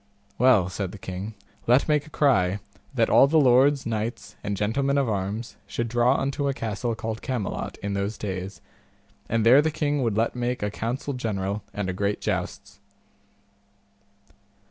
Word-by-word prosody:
Well, 120 -7 +5
said 95 0 -4
the - - -9
king, 95 +3 -6 0.3
let 125 +3 +4
make 150 -1 +1
a - - -12
cry, 100 -11 +2 0.4
that - - +3
all 135 - +6
the 160 +3 +3
lords, 135 +1 +4
knights, 115 +1 -3
and 100 -1 -2
gentlemen 135 +7 +1
of 140 -2 +2
arms, 105 +2 -3
should 115 +3 -2
draw 120 +3 +3
unto 140 +1 -1
a 135 - 0
castle 115 +1 -2
called 110 0 -4
Camelot 125 -7 -3
in 100 0 -2
those 100 +2 -2
days, 95 -2 -5 0.7
and 115 -1 +1
there 130 +5 +8
the 160 - +1
king 145 -2 -1
would 115 -4 0
let 115 +2 +1
make 125 -1 -2
a 105 - -1
council 125 +7 -3
general 105 -4 -2
and 105 -2 -3
a 90 - -2
great 100 +2 -1
jousts. 100 +1 -4
115 Hz, 165 wpm, -25 LUFS, 100-130 Hz, 0.7 s, there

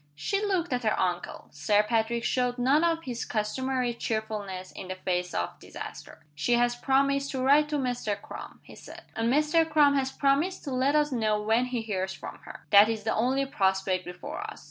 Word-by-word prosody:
She 395 - -1
looked 360 -7 0
at 245 - 0
her 215 -2 0
uncle. 180 -1 -2
Sir 205 +8 +2
Patrick 230 +1 0
showed 250 0 0
none 270 +6 +3
of 330 -1 +1
his 240 -2 -4
customary 250 +3 -1
cheerfulness 215 -5 -4
in - - -8
the 185 - -4
face 180 -1 -2
of 85 - -3
disaster. - - -10
"She 150 +12 0
has 240 0 +3
promised 275 +2 +1
to 260 -1 -2
write 295 +3 +4
to 300 - -1
Mr. 245 -6 -1
Crum," - - -10
he - - -14
said. - - -12
"And 225 +1 +1
Mr. 305 +4 +3
Crum 295 -2 +5
has 265 -1 0
promised 280 +8 +1
to 280 - -5
let 265 +3 +2
us 295 -1 +2
know 215 -4 +1
when 220 +4 +2
he 250 -2 -3
hears 190 -3 -2
from - - -9
her. - - -11
That 205 +1 +8
is 220 -2 -2
the 220 - 0
only 260 +4 +1
prospect 190 -6 0
before 180 - -7
us. 430 +1 -7
245 Hz, 200 wpm, -28 LUFS, 210-275 Hz, -, That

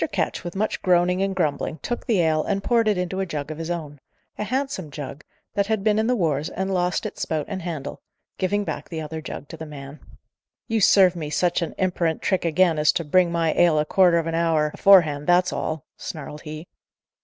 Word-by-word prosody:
Ketch, - - -2
with 175 0 -6
much 215 +3 -1
groaning 180 0 +2
and 195 0 0
grumbling, 155 -2 -1
took 240 - -4
the 210 -6 +3
ale 155 -2 +2
and 200 -1 -2
poured 230 -2 +2
it 210 -3 +2
into 180 +1 -2
a 195 - 0
jug 150 -2 -4
of 155 - -7
his 165 0 -4
own 155 -4 -5 0.4
a - - -3
handsome 255 - -2
jug, 145 0 -8 0.3
that 200 -1 0
had 220 -2 0
been 215 0 +3
in 220 - +1
the 250 - +2
wars 155 - 0
and 190 +1 -3
lost 180 +3 0
its 215 - -6
spout 155 -2 -1
and 190 -2 -5
handle 165 -5 -5 0.4
giving 205 +2 0
back - - -5
the 165 - -4
other 160 +1 -5
jug 145 - -7
to 165 - -8
the 160 - -7
man. 140 0 -9 0.7
"You 225 -2 0
serve 185 -2 +6
me 155 -3 -4
such 175 +3 +1
a 170 - -4
imperant 175 -3 0
trick 190 -3 0
again, 165 -1 +3
as 150 0 +4
to 170 - -1
bring 175 +3 +3
my 165 -2 +1
ale 170 -3 +4
a 150 - +2
quarter 180 0 +4
of 165 - 0
a 165 - -3
hour 160 -2 +1
aforehand, 155 -7 +5
that's 180 +1 +3
all!" 155 -2 -3
snarled 150 -1 -7
he. 155 +1 -8
170 Hz, 225 wpm, -23 LUFS, 155-190 Hz, 0.7 s, serve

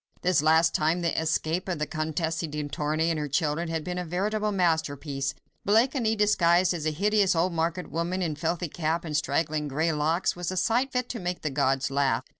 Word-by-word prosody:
This 180 -4 +3
last 160 +1 +4
time, 160 +3 +1
the 170 -1 0
escape 165 +3 -1
of 175 - -1
the 150 - -1
Comtesse 160 +1 -2
de 150 -3 -3
Tournay 155 +4 0
and 160 - -1
her 150 - -2
children 155 +3 -1
had 160 -1 -2
been 180 +2 -3
a - - -2
veritable 210 +5 -1
masterpiece—Blakeney 170 - 0
disguised 185 -4 +3
as 160 -3 -3
a - - +1
hideous 200 +3 +2
old 170 +2 +1
market 170 +2 -2
woman, 175 +3 -1
in 160 -3 -2
filthy 170 +3 -2
cap 160 +2 -2
and 155 -2 -4
straggling 150 +1 0
grey 155 +4 0
locks, 160 +4 0
was 175 -1 -4
a 185 - -4
sight 240 +8 +1
fit 250 -1 -1
to 235 - -4
make 180 0 -4
the 155 - -1
gods 135 -1 +1
laugh. 135 -3 +1
165 Hz, 200 wpm, -27 LUFS, 150-180 Hz, -, last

